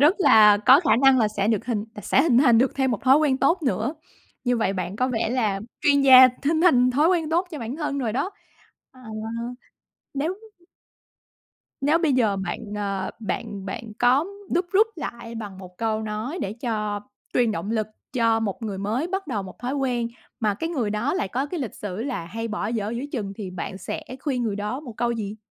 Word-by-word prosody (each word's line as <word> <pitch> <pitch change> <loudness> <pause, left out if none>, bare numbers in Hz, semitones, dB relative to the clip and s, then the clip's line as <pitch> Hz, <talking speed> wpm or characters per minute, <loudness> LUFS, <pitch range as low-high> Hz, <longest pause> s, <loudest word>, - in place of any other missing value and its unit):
rất 305 +7 +6
là 215 - +7
có 265 +4 +8
khả 280 -10 +3
năng 270 -1 +6
là 220 -3 +3
sẽ 210 -1 -1
được 220 -3 +1
hình 220 -4 -1
t 210 - -9
sẽ - - +3
hình 270 -7 +4
thành 245 -4 +5
được 260 +2 +2
thêm 265 -1 +1
một 225 - -2
thói 265 +2 +6
quen 290 -4 +2
tốt 325 +7 +2
nữa. 235 - -1 0.5
Như 245 -1 +2
vậy 220 -4 +1
bạn 185 +1 -4
có 255 +2 +1
vẻ 225 -3 -1
là 215 -6 0 0.2
chuyên 280 -1 +4
gia 260 -1 +9 0.2
hình 315 +1 +2
thành 255 -8 +5
thói 295 +6 +3
quen 335 -4 +1
tốt 350 +3 +1
cho 310 - -6
bản 235 +2 -5
thân 295 -3 -2
rồi 235 -5 -1
đó. 275 - -1 0.6
Ờ, 255 - -18 1.1
nếu 295 +6 -1 1.5
Nếu 295 +4 +3
bây 325 -4 +2
giờ 225 -6 +2
bạn, 190 -2 -4 0.2
ờ, 195 -2 -2
bạn 210 -3 -4
bạn 215 +3 -6
có 255 +5 +4 0.3
đúc 350 +1 +1
rút 420 +3 +5
lại 235 -6 -6
bằng 205 -4 -7
một 180 -1 -12
câu 220 -1 -1
nói 220 +9 -4
để 195 - -3
cho 215 -3 -3 0.3
truyền 240 -3 +3
động 210 0 -4
lực 220 -2 0 0.3
cho 230 -3 +2
một 215 +1 -3
người 205 -3 -4
mới 220 +10 -1
bắt 385 +1 -3
đầu 220 -8 -2
một 185 -1 -11
thói 250 +2 -3
quen, 250 -4 -1 0.3
mà 210 -3 +1
cái 325 +11 -3
người 255 -11 -1
đó 220 +9 -1
lại 370 - -1
có 260 +8 -2
cái 325 +2 -4
lịch 245 -6 -4
sử 205 +1 -5
là 245 -10 -3
hay 225 +7 -5
bỏ 215 -1 -3
dở 215 -2 -2
giữa 235 +3 -4
chừng, 205 -6 -3
thì 200 -4 -6
bạn 185 +1 -6
sẽ - - -5 0.2
khuyên 265 -4 -1
người 215 -4 -1
đó 210 +7 -3
một 255 -6 -9
câu 240 +1 0
gì? 215 -2 -4
235 Hz, 220 wpm, -24 LUFS, 210-275 Hz, 1.5 s, gia